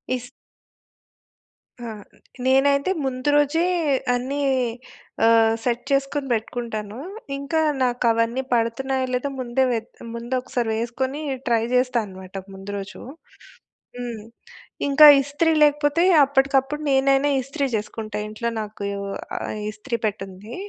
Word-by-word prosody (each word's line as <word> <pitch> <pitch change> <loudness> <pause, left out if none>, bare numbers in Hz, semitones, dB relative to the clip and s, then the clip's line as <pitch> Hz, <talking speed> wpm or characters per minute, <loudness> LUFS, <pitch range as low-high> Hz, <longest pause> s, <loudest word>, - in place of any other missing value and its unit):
Is 250 0 -7 1.5
ఆ! 240 - -7 0.6
నేనైతే 280 +5 +3
ముందు 255 +1 -1
రోజే 295 +3 +3 0.5
అన్నీ 260 +4 -2 0.9
ఆహ్, 225 -1 +5
సెట్ 240 0 -1
చేసుకొని 275 +1 0
పెట్టుకుంటాను. 220 -2 -4 0.4
ఇంక 280 +2 -8 0.3
నాకు 245 0 0
అవన్నీ 230 +3 0
పడుతున్నాయో 260 +3 0
లేదో 250 +3 -1
ముందే 255 +1 0
వె‌త్ 225 -1 -5
ముందు 235 +2 -5
ఒక్కసారి 245 -2 -2
వేసుకొని 260 +5 -2 0.3
ట్రై 230 -2 +2
చేస్తా 250 0 +2
అన్నమాట 190 -1 -12 0.2
ముందు 195 +1 -8
రోజు. 200 +1 -8 1.0
హ్మ్, 240 -3 -5 0.6
ఇంక 280 +1 +1 0.2
ఇస్త్రీ 290 +4 0
లేకపోతే 295 +2 +3 0.2
అప్పటికప్పుడు 275 +1 +1
నేనైనా 275 +1 +3
ఇస్త్రీ 275 +3 -3
చేసుకుంట 215 +1 -6
ఇంట్లో 225 +2 -3
నాకు 210 -1 -6 0.5
ఆహ్, - - -4
ఇస్త్రీ 235 +3 -4
పె‌టుంది. 195 +2 -7
250 Hz, 110 wpm, -23 LUFS, 225-275 Hz, 1.5 s, ఆహ్